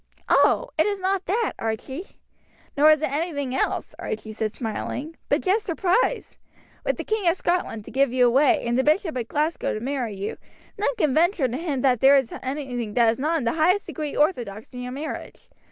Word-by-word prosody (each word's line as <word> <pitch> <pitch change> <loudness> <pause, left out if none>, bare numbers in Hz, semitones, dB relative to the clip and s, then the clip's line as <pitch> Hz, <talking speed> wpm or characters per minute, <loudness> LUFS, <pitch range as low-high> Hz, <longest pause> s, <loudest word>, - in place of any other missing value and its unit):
"Oh! - - +3
it 315 - +4
is 405 -1 -1
not 380 0 -1
that, 435 +4 0
Archie." 245 - -4 0.7
"Nor 295 +2 +6
is 310 0 +4
it 265 - 0
anything 285 -4 -2
else," 265 - -1
Archie 215 0 -5
said 215 0 -2
smiling, 260 +7 -5
"but - - +2
just 410 +3 +1
surprise. 390 +7 0 0.5
With - - 0
the - - -4
King 430 -4 -1
of 335 - +1
Scotland 345 - -1
to - - -10
give 270 -1 +2
you 250 0 +4
away 265 +3 +3
and 235 0 0
the - - +3
Bishop 315 +2 +1
of 240 -2 -3
Glasgow 305 +5 -1
to - - -3
marry 245 -3 -3
you, 195 +2 -4 0.4
none 425 +5 0
can 310 - +1
venture 335 -2 +3
to 245 - -4
hint 290 -4 -2
that 255 -4 +3
there 275 +3 +7
is 265 -4 -1
anything 255 -5 -4
that 235 -2 +5
is 230 - -6
not 315 +4 +1
in 295 - -2
the 230 - +1
highest 360 +6 +2
degree 305 -2 -5
orthodox 240 - -1
in 250 - -6
your 250 0 -5
marriage. 290 +4 -7
280 Hz, 205 wpm, -24 LUFS, 245-335 Hz, 0.7 s, there